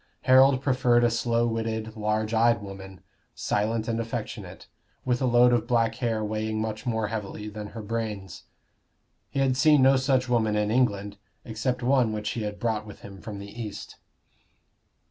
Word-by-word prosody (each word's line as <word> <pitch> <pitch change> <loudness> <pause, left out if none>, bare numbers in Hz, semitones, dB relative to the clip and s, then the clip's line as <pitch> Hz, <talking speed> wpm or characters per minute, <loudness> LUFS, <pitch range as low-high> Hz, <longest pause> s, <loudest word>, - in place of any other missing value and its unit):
Harold 130 +1 +5
preferred 125 -3 +3
a 120 - +3
slow 115 0 +1
witted 110 -1 -3
large 110 0 -1
eyed 115 +1 +4
woman, 95 -2 -10 0.3
silent 110 +2 -1
and 115 -1 -1
affectionate, 115 0 -6 0.4
with 125 0 0
a 130 - +2
load 120 0 +5
of 120 -1 +1
black 115 -2 +2
hair 115 -3 -1
weighing 110 0 -2
much 110 +2 -4
more 110 -3 -1
heavily 105 -1 -5
than 105 0 -7
her 110 +1 -8
brains. 105 -4 -5 0.8
He - - -7
had 130 -2 +2
seen 145 +1 +5
no 135 +1 +6
such 130 -1 +1
woman 110 -3 +1
in 105 0 0
England, 105 -5 0 0.3
except 125 +2 -2
one 125 -3 +3
which 105 -1 -3
he 115 - -4
had 105 -1 -4
brought 110 -2 -1
with 105 - -11
him 100 -1 -11
from 105 -2 -7
the 100 +4 -8
East. 105 -3 -7
115 Hz, 170 wpm, -26 LUFS, 105-120 Hz, 0.8 s, no